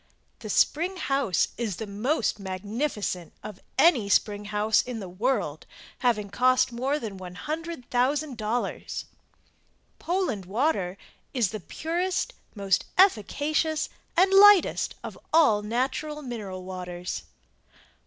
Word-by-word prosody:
The - - -8
Spring 350 +5 +2
House 275 - +1
is 220 -6 -2
the 220 - -5
most 215 +4 -1
magnificent 200 - -3
of 210 -3 -8 0.2
any 265 - +4
spring 205 0 +2
house 210 +1 +2
m 245 -3 -4
the 195 - -6
world 185 - -2 0.3
having 215 -5 +1
cost 255 +1 +3
more 260 +5 -1
then 215 -8 -6
$100,000. 250 - -2 0.9
"POLAND" 340 - -1
WATER 200 - 0 0.4
IS 230 -7 +2
the 215 - -4
purest, 345 - -2 0.2
most 195 -3 +1
efficacious 310 - +2 0.3
and 380 +2 +5
lightest 405 -2 +6
of - - -8
all 295 -11 +5
natural 265 +7 -2
mineral 205 -7 -6
waters. 180 -1 -5
235 Hz, 110 wpm, -26 LUFS, 200-300 Hz, 0.9 s, lightest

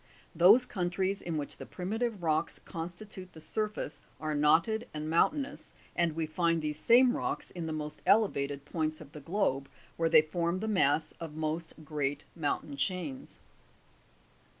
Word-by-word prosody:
Those 195 +10 +7
countries 190 -1 -1
in 165 -2 -3
which 145 - -2
the - - -8
primitive 215 +2 -3
rocks 155 0 +1
constitute 180 +2 -7
the 160 - -11
surface 210 -2 -3 0.2
are 155 -1 -2
knotted 165 +11 +3
and 150 0 -3
mountainous, 275 - +1 0.2
and 170 -2 +2
we 165 -1 0
find 165 +1 +1
these 150 -1 -1
same 245 +5 +6
rocks - - -3
in 170 -2 -5
the - - -3
most 150 -1 -5
elevated 140 -10 +2
points 155 0 -2
of 150 -2 -12
the 150 -1 -9
globe, 140 -5 0 0.3
where 165 -1 +2
they 155 - +7
form 170 +3 -1
the 220 - -3
mass 160 -7 +2
of 160 -3 -7
most 160 0 -4
great 145 -1 -2
mountain 145 -2 -2
chains. 160 -4 -3
165 Hz, 155 wpm, -31 LUFS, 155-190 Hz, 0.3 s, Those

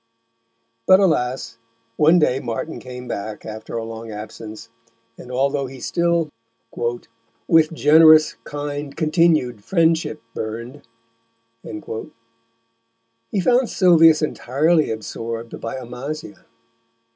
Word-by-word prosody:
But 185 - +7
alas! 130 -10 0 0.4
one 160 +6 +5
day 135 -5 +2
Martin 125 +4 -5
came 125 -1 -9
back, 105 -2 -6
after 110 +1 -7
a 115 - -3
long 115 0 -8
absence, 110 +1 -9 0.5
and, 125 - -11
although 135 +2 0
he 130 0 -11
still 170 +3 0 1.2
With 160 -1 +4
generous, 155 0 +6
kind, 145 -1 -5
continu'd 155 - +2
Friendship 160 - +1
burn'd, 115 +6 -6 0.8
he 115 - -10
found 245 +5 +2
Sylvius 165 -4 +5
entirely 155 +3 +1
absorbed 115 +1 -6
by 115 - -4
Amasia. 140 +6 -7
135 Hz, 100 wpm, -21 LUFS, 115-160 Hz, 1.2 s, But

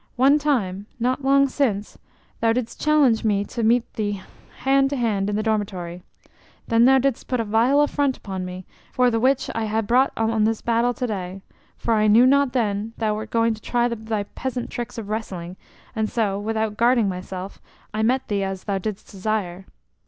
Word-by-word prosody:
"One 275 +4 +4
time, 210 -10 -1
not 255 +3 0
long 275 +1 +4
sin, 250 -7 0 0.6
thou 225 0 +3
didst 235 -1 -4
challenge 295 -7 +3
me 205 -2 +1
to 235 - -5
meet 230 +2 +3
thee 205 -2 -2 0.4
hand 270 +1 +3
to 285 - -2
hand 210 -6 0
in 205 - -1
the 215 - 0
dormitory. 190 -5 -2 0.7
Then 230 +1 +5
thou 265 +1 +6
didst 265 -2 0
put 250 - -1
a - - +1
vile 230 +7 +3
affront 285 -2 +1
upon 190 -2 -5
me, 180 0 -7 0.3
for 250 -1 +3
the 225 - +1
which 260 +3 +1
I 225 -1 -2
ha' 220 +1 -1
brought 250 +5 +3
on 225 -1 +1
this 225 0 0
battle 235 +1 +1
to 250 - -2
day, 190 -3 -5 0.3
for 230 - 0
I 215 -1 +3
knew 225 +4 +6
not 275 0 +3
then 215 -2 -1
that 225 - -2
thou 210 -1 +1
wert 215 - -6
going 230 0 +2
to 220 - -11
try 240 +1 +1
thy 220 -3 -3
peasant 250 +3 -5
tricks 240 +1 -5
of 220 -3 -5
wrestling, 185 -5 -4 0.4
and 220 -1 0
so, 205 -4 0
without 220 0 -2
guarding 235 -1 +3
myself, 185 0 -6 0.3
I 215 - -1
met 255 +4 +1
thee 205 -3 -1
as 190 -1 -4
thou 200 -2 -1
didst 210 +1 -6
desire." 195 -2 -3
225 Hz, 195 wpm, -23 LUFS, 205-250 Hz, 0.7 s, thou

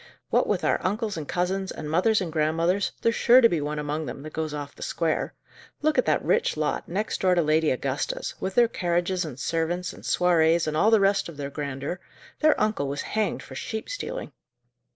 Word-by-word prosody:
"What - - +3
with - - 0
our - - +2
uncles 210 +2 -1
and 155 -3 -5
cousins, 190 +2 -1
and 155 - -6
mothers 185 +8 +2
and 170 -4 -4
grandmothers, 165 +5 +1
there's 230 - +3
sure 245 +2 +6
to 235 - +7
be 170 -8 -1
one 150 +1 -3
among 150 +1 -3
them 135 +3 -7
that 155 - -9
goes 155 -1 -2
off 145 -1 -6
the - - -16
square. 165 -2 -1 0.5
Look 310 0 +3
at - - +2
that - - +1
rich 470 - +1
lot, - - -1
next 205 +5 -2
door 185 -1 +4
to 175 - +3
Lady 155 +1 +2
Augusta's, 130 +1 -2
with 190 0 -3
their 240 -1 +6
carriages 175 -2 -1
and 135 -4 -8
servants, 165 +4 -1
and - - -13
soirées, 170 -2 +3
and 155 -1 -2
all 205 +8 +4
the 225 -1 +5
rest 195 -2 +2
of 160 - -11
their 140 -1 -5
grandeur! 140 +3 -4 0.4
their 310 0 +4
uncle 215 -10 0
was 140 +1 -3
hanged 215 -2 0
for - - -11
sheep 220 - -5
stealing." - - -5
170 Hz, 215 wpm, -26 LUFS, 150-200 Hz, 0.5 s, to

